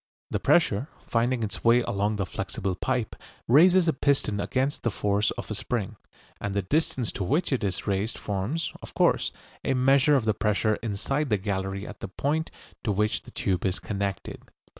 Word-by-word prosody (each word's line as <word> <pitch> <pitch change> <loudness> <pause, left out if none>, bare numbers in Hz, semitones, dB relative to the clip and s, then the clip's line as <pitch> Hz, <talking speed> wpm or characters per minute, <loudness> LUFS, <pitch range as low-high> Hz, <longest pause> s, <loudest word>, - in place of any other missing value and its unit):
The - - 0
pressure, 135 -7 +3 0.2
finding 120 +1 +1
its 105 -2 -4
way 120 +1 +5
along 105 +1 0
the 100 -2 -1
flexible 95 +1 -3
pipe, 125 +4 -2 0.3
raises 175 +7 +6
a 160 - +4
piston 135 -7 +1
against 130 +6 -1
the 120 - +1
force 105 0 +1
of - - -6
a - - 0
spring, 110 0 -2 0.4
and 100 -1 -3
the 100 - +1
distance 130 - 0
to 100 - -3
which 145 - +1
it 125 - 0
is 95 -3 -2
raised 100 +3 -1
forms, 105 - -2
of - - -11
course, - - +3 0.3
a 135 - +1
measure 135 +3 +5
of 130 -5 +2
the 110 - +3
pressure 105 +1 +1
inside 130 +7 -2
the 105 - +3
gallery 95 0 -3
at - - -9
the - - -5
point 150 - -1 0.3
to 110 - 0
which 105 +2 +1
the - - -14
tube 95 -2 -1
is 95 0 0
connected. 100 -1 -4
110 Hz, 185 wpm, -27 LUFS, 100-135 Hz, 0.4 s, raises